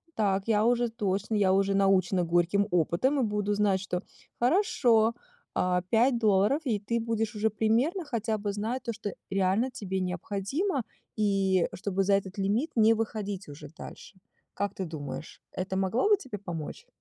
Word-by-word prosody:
так, 195 Hz, -2 st, 0 dB
я 215 Hz, -1 st, +3 dB
уже 240 Hz, 0 st, +2 dB
точно, 210 Hz, -1 st, -2 dB
я 195 Hz, -2 st, +3 dB
уже 195 Hz, 0 st, +2 dB
научена 190 Hz, -2 st, +3 dB
горьким 175 Hz, +4 st, +2 dB
опытом 180 Hz, -, +2 dB
и -, -, +2 dB
буду 210 Hz, -1 st, 0 dB
знать, 205 Hz, -2 st, +2 dB
что, 180 Hz, -2 st, -3 dB, 0.4 s
хорошо, 240 Hz, -, +3 dB, 0.4 s
а, 180 Hz, -1 st, +1 dB
5 240 Hz, +2 st, +3 dB
долларов, 215 Hz, +7 st, +3 dB
и 220 Hz, -6 st, 0 dB
ты 230 Hz, +3 st, -1 dB
будешь 225 Hz, -1 st, -2 dB
уже 220 Hz, +1 st, +1 dB
примерно 235 Hz, -, +1 dB
хотя 225 Hz, -5 st, -1 dB
бы 205 Hz, 0 st, -2 dB
знать 225 Hz, +5 st, -2 dB
то, 235 Hz, -, -3 dB
что 205 Hz, -2 st, -5 dB, 0.2 s
реально 195 Hz, +5 st, +1 dB
тебе 190 Hz, -5 st, -3 dB
необходимо, 200 Hz, -, -2 dB, 0.3 s
и 195 Hz, -4 st, +2 dB
чтобы 195 Hz, -1 st, -1 dB
за 200 Hz, +1 st, +2 dB
этот 195 Hz, 0 st, -1 dB
лимит 210 Hz, +11 st, 0 dB
не 225 Hz, -1 st, +5 dB
выходить 210 Hz, -3 st, -4 dB
уже 145 Hz, +1 st, -9 dB
дальше. 165 Hz, +4 st, -11 dB, 0.4 s
Как 200 Hz, 0 st, -2 dB
ты 190 Hz, -, -3 dB
думаешь, 155 Hz, -2 st, -7 dB
это 190 Hz, +1 st, -4 dB
могло 195 Hz, -, +1 dB
бы 415 Hz, -, +6 dB
тебе 230 Hz, -, -7 dB
помочь? 170 Hz, -6 st, -6 dB
205 Hz, 165 wpm, -28 LUFS, 190-230 Hz, 0.4 s, бы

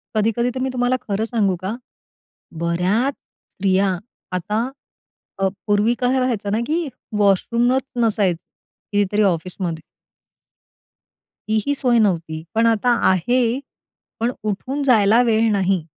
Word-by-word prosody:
कधी-कधी 225 Hz, +3 st, +1 dB
तर 260 Hz, -, -5 dB
मी 260 Hz, +1 st, -1 dB
तुम्हाला 245 Hz, 0 st, +1 dB
खरं 210 Hz, +1 st, -2 dB
सांगू 210 Hz, -5 st, +1 dB
का? 200 Hz, +4 st, -2 dB, 0.9 s
बऱ्याच 185 Hz, +11 st, +1 dB, 0.4 s
स्त्रिया, 190 Hz, -1 st, +1 dB, 0.3 s
आता 210 Hz, +7 st, -1 dB, 0.7 s
अ, 195 Hz, -, +2 dB, 0.2 s
पूर्वी 205 Hz, +3 st, +3 dB
काय 255 Hz, +1 st, +2 dB
व्हायचं 230 Hz, -6 st, -1 dB
ना, 215 Hz, -, +1 dB
की 325 Hz, 0 st, 0 dB, 0.3 s
वॉशरूमच 235 Hz, +6 st, +2 dB, 0.2 s
नसायचं 200 Hz, -6 st, +1 dB, 0.5 s
कितीतरी 205 Hz, +1 st, +2 dB
ऑफिसमध्ये. 175 Hz, -2 st, -1 dB, 1.7 s
तीही 220 Hz, +6 st, 0 dB
सोय 250 Hz, -3 st, +2 dB
नव्हती, 165 Hz, -6 st, 0 dB
पण 225 Hz, -, +3 dB
आता 230 Hz, +2 st, +2 dB, 0.2 s
आहे, 235 Hz, +7 st, +2 dB, 0.6 s
पण 235 Hz, +2 st, +1 dB
उठून 255 Hz, +8 st, -2 dB
जायला 225 Hz, -3 st, +5 dB
वेळ 225 Hz, -1 st, +3 dB
नाही. 190 Hz, -4 st, +1 dB
215 Hz, 115 wpm, -21 LUFS, 190-245 Hz, 1.7 s, जायला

